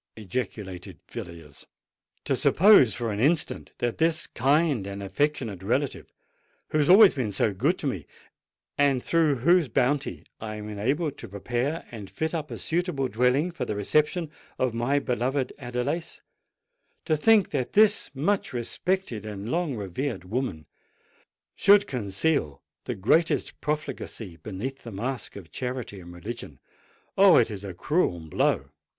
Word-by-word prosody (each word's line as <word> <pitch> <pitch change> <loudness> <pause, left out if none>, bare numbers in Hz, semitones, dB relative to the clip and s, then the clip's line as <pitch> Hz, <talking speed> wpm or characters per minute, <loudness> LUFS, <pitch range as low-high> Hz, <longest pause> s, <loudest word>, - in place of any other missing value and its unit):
ejaculated 95 -4 -5
Villiers. 85 -10 -9 0.6
"To - - +1
suppose 185 - +6
for 115 -2 -2
an 100 - -3
instant 155 +6 0
that 120 -1 -2
this 165 0 +2
kind 140 - +1
and 100 0 -6
affectionate 115 -3 -1
relative—who 130 +7 -5
has 150 - +2
always 200 +2 +9
been 120 -6 -2
so 100 +1 +1
good 95 - +1
to - - -6
me, - - -3 0.7
and 140 -3 +3
through 160 -4 +2
whose 175 -3 +5
bounty 135 +3 0
I 110 -1 -5
am 105 0 -7
enabled 135 +9 -1
to - - -7
prepare 120 - -2
and 105 -5 -8
fit 160 +1 -3
up 155 -3 -3
a - - -6
suitable 165 -6 -1
dwelling 125 - +2
for 170 - -4
the 105 - -3
reception 150 - +1 0.3
of 130 -3 0
my 120 +5 +1
beloved 130 0 -1
Adelais,—to 160 - -5
think 210 +5 +4
that 125 - -2
this 210 0 +4
much 170 +4 0
respected 125 - -2
and 105 0 -6
long 165 -5 0
revered 110 +3 -4
woman 95 - -3 0.9
should 205 0 +5
conceal 105 - -1 0.2
the - - -3
greatest 155 - +1
profligacy 150 - -4
beneath 110 - -6
the 115 - -9
mask 120 +6 -4
of 90 -6 -11
charity 125 -4 -5
and 85 -1 -11
religion—oh! 120 - -1
it 115 -2 +3
is 100 -2 -6
a 95 -3 -7
cruel 145 - 0
blow!" 75 -3 0
125 Hz, 140 wpm, -26 LUFS, 105-155 Hz, 0.9 s, always